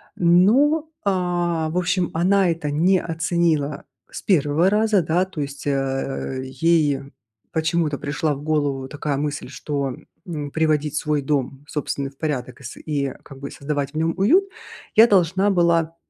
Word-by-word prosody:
Но, 240 - +4 0.2
а, 175 -4 0
в 175 - -3
общем, 180 0 +1
она 185 +2 +3
это 160 -3 -2
не 180 +5 +3
оценила 165 -3 0 0.3
с - - -8
1 165 0 +2
раза, 210 -2 +3
да, 170 +4 +1
то 175 -6 -6
есть, 140 0 -6
э, 135 -1 -2
ей 145 +1 +2 0.5
почему-то 160 -2 0
пришла 150 +1 -1
в 140 - -9
голову 145 -4 -1
такая 145 -1 -3
мысль, 145 -2 -3
что, 140 -2 -3 0.3
м, 150 -5 -5
приводить 155 -2 0
свой 150 0 0
дом 135 0 -2
собственный 140 -2 -3
в 135 - -29
порядок 130 -5 -4
и - - -14
с 120 - -8
и 140 -4 -2
как 135 -1 -12
бы 140 0 -6
и - - -14
создавать 140 -1 -3
в - - -5
нём 165 +1 +1
уют 335 - +4 0.5
я 225 +2 +8
должна 190 0 +3
была, 170 -3 +2
155 Hz, 160 wpm, -22 LUFS, 140-175 Hz, 0.5 s, я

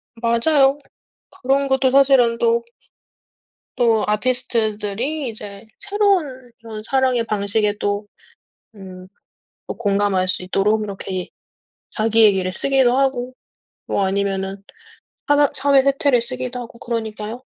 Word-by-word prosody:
맞아요. 270 +5 +2 0.6
그런 275 +2 +1
것도 265 -1 +2
사실은 265 -4 +4
또 235 0 +1 1.1
또 230 -3 +2
아티스트들이 235 +3 -1
이제 205 -2 -10
새로운 375 - -1
그런 220 -2 -8
사랑의 260 -2 +1
방식에 210 0 -1
또 205 0 -2 0.7
음 185 -2 -11 0.7
또 - - -6
공감할 200 -3 0
수 185 - -1
있도록 200 +4 0
이렇게 195 -2 -6
예 - - -6 0.6
자기 225 0 +2
얘기를 190 -3 +3
쓰기도 260 +3 +2
하고 255 -2 -1 0.5
뭐 195 - 0
아니면은 195 0 -2 0.7
하나 290 -1 +4
사회 280 -1 +3
세태를 275 -2 +2
쓰기도 255 0 -5
하고 235 -1 -9
그러니까요. 225 +1 -5
230 Hz, 265 characters per minute, -20 LUFS, 205-265 Hz, 1.1 s, 사실은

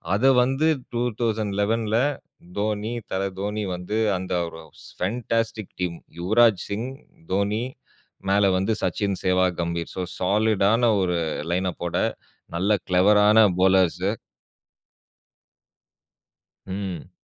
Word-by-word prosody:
அத 115 - +1 0.2
வந்து 135 +5 +1 0.3
2011ல 110 -2 0 0.6
தோனி, 105 +2 -1 0.2
தல 95 +1 -1 0.2
தோனி 105 +1 -2
வந்து 90 +5 -4 0.2
அந்த 95 0 -4
ஒரு 80 0 -9 0.4
ஃபேன்டாஸ்டிக் 115 +1 -2
டீம் 85 -2 -2 0.2
யுவராஜ் 110 +1 +4
சிங், 110 +5 -3 0.4
தோனி 100 +4 0 0.7
மேல 100 0 +4
வந்து 100 +4 +1
சச்சின், 95 +1 0
சேவாக், 90 -1 +2
கம்பீர். 85 0 -3
சோ 95 - -3 0.2
சாலிடான 110 +3 +3
ஒரு 90 -1 0 0.3
லைன் 90 +1 +1
அப்போட 85 -1 -5 0.6
நல்ல 100 +4 +2
கிளெவரான 105 +4 +5 0.2
பவுலர்ஸ்ஸூ. 95 0 +3 2.5
ம். 95 -3 -5
100 Hz, 95 wpm, -24 LUFS, 95-110 Hz, 2.5 s, கிளெவரான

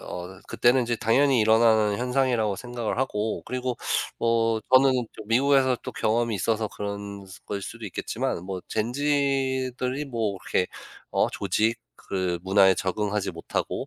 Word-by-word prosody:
어 90 +1 -8
그때는 125 +2 +3
인제 120 0 -1
당연히 130 +3 +3
일어나는 110 -1 +4
현상이라고 125 -5 +1
생각을 120 +1 -4
하고 110 -4 -1
그리고 125 -1 -3 0.4
뭐 115 -1 +2
저는 130 +1 +7 0.2
좀 110 - -11
미국에서 130 +1 +3
또 - - -6
경험이 115 0 0
있어서 110 +2 0
그런 100 -1 -6 0.2
거일 100 -1 -3
수도 115 +2 -8
있겠지만 90 -2 -3
뭐 95 -1 -5
젠지들이 130 +1 0
뭐 110 -6 -2
그렇게 90 - 0 0.4
어 - - +2
조직 110 +2 0 0.2
그 90 -2 -2
문화에 95 0 +5
적응하지 100 +2 -1
못하고 85 -2 -3
115 Hz, 320 characters per minute, -26 LUFS, 100-125 Hz, 0.4 s, 저는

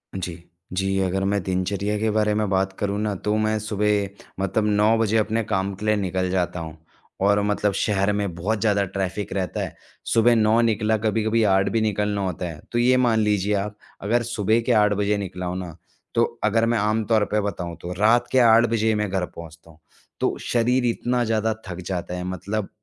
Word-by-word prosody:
जी। 85 -3 -5 0.3
जी, 95 +1 0
अगर 95 +1 0
मैं 100 0 +1
दिनचर्या 100 +3 -1
के 110 - +1
बारे 105 0 +2
में 105 -2 0
बात 95 0 +1
करूँ 100 0 -1
ना 105 -1 -1
तो 105 +3 -1
मैं 110 0 +1
सुबह 105 -1 0 0.3
मतलब 95 +3 0
9 105 +2 +3
बजे 110 0 +2
अपने 110 +1 +1
काम 100 -1 -1
के 105 +3 -7
लिए 105 - +3
निकल 95 -2 -1
जाता 90 -1 -1
हूँ 80 -1 -7 0.5
और 100 0 +3
मतलब 105 0 0
शहर 100 0 +1
में 100 -3 -2
बहुत 105 +6 -1
ज़्यादा 100 -2 +2
ट्रैफ़िक 95 +1 -4
रहता 95 -3 -2
है - - -5 0.4
सुबह 115 +1 +5
9 110 +1 +3
निकला, 110 -1 +1
कभी-कभी 110 +1 +1
8 95 -1 +3
भी 115 - 0
निकलना 105 -1 0
होता 90 -2 -3
है। 80 - -9
तो 120 - 0
ये 125 +1 +4
मान 120 -3 +3
लीजिए 105 -1 +1
आप 105 +1 -3 0.3
अगर 120 +4 +2
सुबह 110 -1 +1
के 125 - -1
8 105 -2 +4
बजे 105 +1 0
निकला 90 -2 -5
हूँ 90 +1 -3
ना 90 -4 -7 0.4
तो - - +4 0.2
अगर 115 +2 +3
मैं 120 +1 +1
आम 110 +1 +1
तौर 110 -2 +3
पे 105 - +2
बताऊँ 90 -4 -4
तो 90 +1 -5
रात 120 +3 +4
के 130 - +4
8 115 -1 +6
बजे 110 -1 +1
ही 110 - +3
मैं 105 -1 -1
घर 95 -1 -1
पहुँचता 85 -1 -12
हूँ। 80 - -22 0.4
तो - - 0
शरीर 125 +1 +1
इतना 120 +1 0
ज़्यादा 110 -1 0
थक 90 0 -6
जाता 90 -2 -3
है, 90 - -4
मतलब, 95 +3 -3
105 Hz, 210 wpm, -23 LUFS, 95-110 Hz, 0.5 s, 8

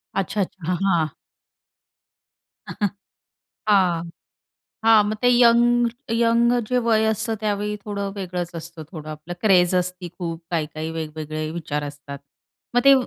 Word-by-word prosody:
अच्छा, 195 +2 0
अच्छा. 180 -3 -5
हां, - - +2
हां. 170 -5 +3 2.6
हां. 180 -5 +3 0.8
हां, 225 -1 +7
मग 215 - -2
ते 245 - +4
यंग 240 0 +5 0.3
यंग 235 +1 +3 0.2
जे 250 - +1
वय 220 -1 +4
असतं 220 +1 -2
त्यावेळी 210 0 -1
थोडं 200 -1 -3
वेगळंच 180 -3 -4
असतं 165 0 -8
थोडं 155 -4 -8
आपलं 155 +3 -7
क्रेझ 185 -4 +4
असती 180 0 -1
खूप 165 -2 -4
काही-काही 155 -1 -2
वेगवेगळे 155 0 -4
विचार 150 -3 -3
असतात. 145 -1 -7 0.6
मग - - +6
ते 275 - +9
180 Hz, 130 wpm, -23 LUFS, 160-220 Hz, 2.6 s, ते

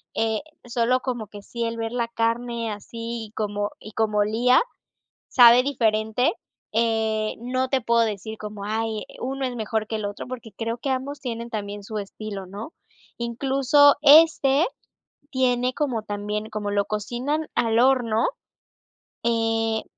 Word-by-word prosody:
eh, 220 -1 +1 0.3
solo 240 +1 +1
como 240 -5 -3
que 205 0 -11
sí 235 +3 -4
el 230 0 -2
ver 225 0 -3
la 235 -1 -1
carne 230 0 -1
así, 230 +1 -6
como 205 -1 -2
y 215 - -10
como 215 -2 +1
olía. 230 +5 +4 0.7
Sabe 245 -1 +8
diferente, 225 - +1 0.4
eh, 220 -1 +1
no 255 +2 -1
te 265 -2 +1
puedo 235 +1 +3
decir 220 0 -4
como, 210 -1 -7
ay, 220 0 -2 0.2
uno 270 +1 -2
es 250 -1 -3
mejor 220 -1 -1
que 220 - -2
el 210 - -4
otro, 205 +4 -5
porque 240 -3 -8
creo 230 +1 -2
que 275 - -3
ambos 275 +2 -2
tienen 235 -2 -4
también 205 -1 -5
su 215 +1 -4
estilo, 200 -1 -7
¿no? 210 - -8 0.4
Incluso 270 +4 +4
este 300 0 +6 0.7
tiene 255 -1 +1
como 255 -7 -1
también 210 +1 -4
como 210 -1 -3
lo 200 0 +1
cocinan 250 +9 -2
al 230 -1 +2
horno, 245 -4 +3 1.0
eh, 225 -1 +1
230 Hz, 145 wpm, -24 LUFS, 215-250 Hz, 1.0 s, Sabe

